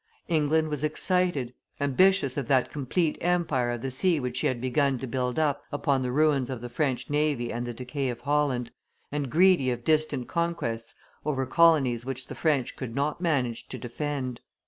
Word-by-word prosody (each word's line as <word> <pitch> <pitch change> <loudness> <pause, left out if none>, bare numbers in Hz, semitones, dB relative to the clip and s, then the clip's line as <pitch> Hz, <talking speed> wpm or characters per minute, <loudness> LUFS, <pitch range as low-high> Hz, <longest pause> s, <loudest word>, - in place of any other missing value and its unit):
England 155 -1 +2
was 150 -1 -3
excited, 155 -4 0 0.3
ambitious 145 +1 +3
of 140 -5 -3
that 130 -1 +2
complete 150 +3 -1
empire 165 -8 +1
of 120 -1 -3
the 135 - -2
sea 165 +5 +2
which 125 -2 -3
she - - +2
had 130 -2 -1
begun 130 +2 +1
to 130 - -5
build 125 +1 -2
up 145 -2 +1
upon 140 -2 +1
the 125 -1 -1
ruins 140 -2 +2
of 130 -3 -4
the 120 +1 -7
French 135 -2 -1
navy 145 -5 0
and 120 +1 -3
the 120 - -4
decay 130 +2 -3
of 120 - -5
Holland, 140 -5 0 0.4
and 145 -2 -2
greedy 170 -3 +4
of 120 -1 -3
distant 155 -4 +1
conquests 170 -10 -2 0.3
over 135 -3 -1
colonies 135 -5 +4
which 130 0 -5
the - - -8
French 145 -6 0
could 120 -3 -6
not 145 +4 -1
manage 130 -9 0
to - - -6
defend. 130 0 -4
140 Hz, 185 wpm, -27 LUFS, 125-155 Hz, 0.4 s, greedy